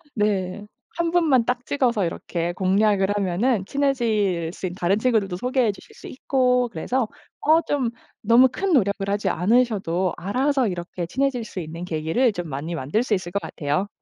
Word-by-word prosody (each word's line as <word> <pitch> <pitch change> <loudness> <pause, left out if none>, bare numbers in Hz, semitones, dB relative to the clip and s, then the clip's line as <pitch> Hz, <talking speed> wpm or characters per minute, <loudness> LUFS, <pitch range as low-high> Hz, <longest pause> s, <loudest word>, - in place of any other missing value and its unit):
네. 205 -2 -1 0.3
1 335 -1 0
분만 300 -9 +3
딱 245 0 -1
찍어서 240 -8 +1
이렇게 170 0 -3
공략을 195 +2 +2
하면은 200 +3 +1
친해질 215 -11 0
수 - - -6
있 180 - -3
다른 185 +1 +1
친구들도 215 -6 +1
소개해 250 +2 +1
주실 195 - -16
수 - - -11
있고 250 -2 +1
그래서 230 +6 -1 0.3
어 315 +2 +4
좀 265 -7 -1 0.3
너무 235 +4 +6
큰 380 +5 -1
노력을 200 -5 +1
하지 205 +1 0
않으셔도 190 -4 +1
알아서 260 +6 +1
이렇게 175 -1 -4
친해질 265 +5 -1
수 205 - -7
있는 165 +1 -6
계기를 165 +10 +1
좀 175 -3 -5
많이 145 +5 -4
만들 155 - 0
수 240 - -1
있을 185 -3 -2
것 200 - 0
같아요. 150 +6 -2
210 Hz, 340 characters per minute, -23 LUFS, 180-250 Hz, 0.3 s, 너무